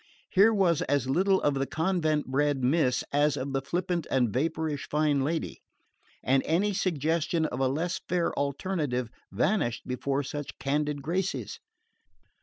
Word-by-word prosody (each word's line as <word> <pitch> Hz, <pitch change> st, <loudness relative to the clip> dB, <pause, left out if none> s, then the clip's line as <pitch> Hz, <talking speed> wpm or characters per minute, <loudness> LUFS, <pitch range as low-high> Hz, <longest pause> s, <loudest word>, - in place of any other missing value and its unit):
Here 205 Hz, +4 st, +6 dB
was 185 Hz, -7 st, +2 dB
as 140 Hz, -2 st, 0 dB
little 190 Hz, +7 st, +3 dB
of 145 Hz, -, +3 dB
the 135 Hz, 0 st, -1 dB
convent 160 Hz, -3 st, 0 dB
bred 140 Hz, 0 st, 0 dB
miss 130 Hz, -2 st, +2 dB
as 145 Hz, 0 st, +3 dB
of 135 Hz, +1 st, -4 dB
the 135 Hz, -, 0 dB
flippant 170 Hz, +4 st, -2 dB
and 125 Hz, -5 st, +1 dB
vapourish 155 Hz, +1 st, -2 dB
fine 150 Hz, -2 st, +2 dB
lady; 160 Hz, +3 st, -3 dB, 0.6 s
and 130 Hz, +1 st, +3 dB
any 195 Hz, +6 st, +2 dB
suggestion 165 Hz, -2 st, 0 dB
of 125 Hz, -, -3 dB
a 135 Hz, -, +2 dB
less 165 Hz, +7 st, -2 dB
fair 175 Hz, -1 st, +1 dB
alternative 140 Hz, -, -2 dB, 0.2 s
vanished 120 Hz, -, 0 dB
before 135 Hz, +2 st, -1 dB
such 145 Hz, +1 st, -6 dB
candid 145 Hz, 0 st, -1 dB
graces. 165 Hz, -, -2 dB
150 Hz, 145 wpm, -28 LUFS, 135-170 Hz, 0.6 s, Here